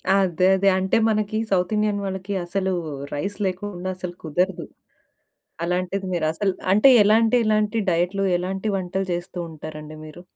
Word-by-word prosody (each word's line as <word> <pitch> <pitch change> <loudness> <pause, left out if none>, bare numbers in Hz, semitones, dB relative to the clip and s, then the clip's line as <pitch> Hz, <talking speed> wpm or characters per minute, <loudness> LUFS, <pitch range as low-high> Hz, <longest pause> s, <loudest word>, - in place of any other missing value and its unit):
అదే 185 -2 +2
అదే. 195 +1 +3
అంటే 190 +4 +1
మనకీ 215 0 0
సౌత్ 180 +1 +1
ఇండియన్ 210 -1 0
వాళ్ళకి 190 +1 -4
అసలూ 190 +1 -1 0.4
రైస్ 195 +8 -3
లేకుండా 185 0 -4
అసలు 180 -1 -5
కుదరదు. 180 +4 -1 1.0
అలాంటిది 185 +2 -2
మీరు 160 -2 0
అసలు 195 +2 0 0.2
అంటే 215 +7 +6
ఎలాంటి, 225 +3 +4
ఎలాంటి 215 +1 +1
డైట్‌లు 180 +4 0
ఎలాంటి 190 +4 -3
వంటలు 190 +1 -3
చేస్తూ 175 +1 -5
ఉంటారండి 155 0 -9
మీరు? 155 +3 -11
190 Hz, 140 wpm, -23 LUFS, 175-205 Hz, 1.0 s, అంటే